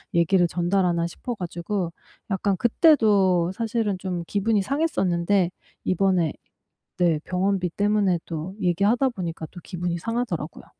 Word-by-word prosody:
얘기를 175 +1 +4
전달하나?' 175 -1 +1
싶어 240 +7 -6
가지고 175 0 -3 0.4
약간 195 0 0
그때도 205 - +4
사실은 220 -2 -1
좀 180 -2 -3
기분이 205 0 +1
상했었는데 190 - +1 0.3
이번에 185 -3 +1 0.6
네, 170 -4 +2
병원비 185 -1 0
때문에 205 -3 +2
또 165 +3 -5
얘기하다 205 +9 +2
보니까 170 -7 -5
또 180 - -10
기분이 175 -2 -3
상하더라고요. 185 -6 -3
185 Hz, 315 characters per minute, -24 LUFS, 175-205 Hz, 0.6 s, 얘기를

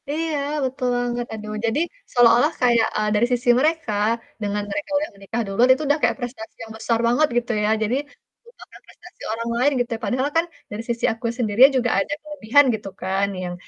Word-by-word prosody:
Iya, 320 +1 -2 0.3
betul 260 0 -3
banget. 240 0 -2
Aduh, 215 -1 -6
jadi, 230 +5 0 0.3
seolah-olah 245 +5 +5
kayak, 235 -2 +4
eee, 215 0 0
dari 215 +3 +3
sisi 245 0 0
mereka, 310 -5 0 0.5
dengan 205 0 -2
mereka 295 +6 -4
udah 300 +1 -2
menikah 200 +4 -4
duluan, 205 +6 +2
itu 265 - -4
udah 290 +2 +3
kayak - - +2
prestasi 240 -3 -7
yang 220 - -10
besar 225 +1 0
banget 250 +6 +3
gitu 240 0 0
ya, 210 - +1
jadi 220 +4 0 0.5
lupakan 475 - -16
prestasi 355 - -17
orang 230 +1 -4
lain 265 +4 +3
gitu 240 - -4
YA. - - -8
Padahal 255 +7 0
kan, 330 - +3 0.3
dari 210 +2 -5
sisi 235 0 -1
aku 225 +1 -10
sendiri 220 -2 -1
juga 245 -1 +1
ada 290 - -3
kelebihan 285 -2 +2
gitu 210 -2 -5
kan, 195 +1 0 0.2
yang 175 -1 -4
240 Hz, 195 wpm, -22 LUFS, 220-275 Hz, 0.5 s, seolah-olah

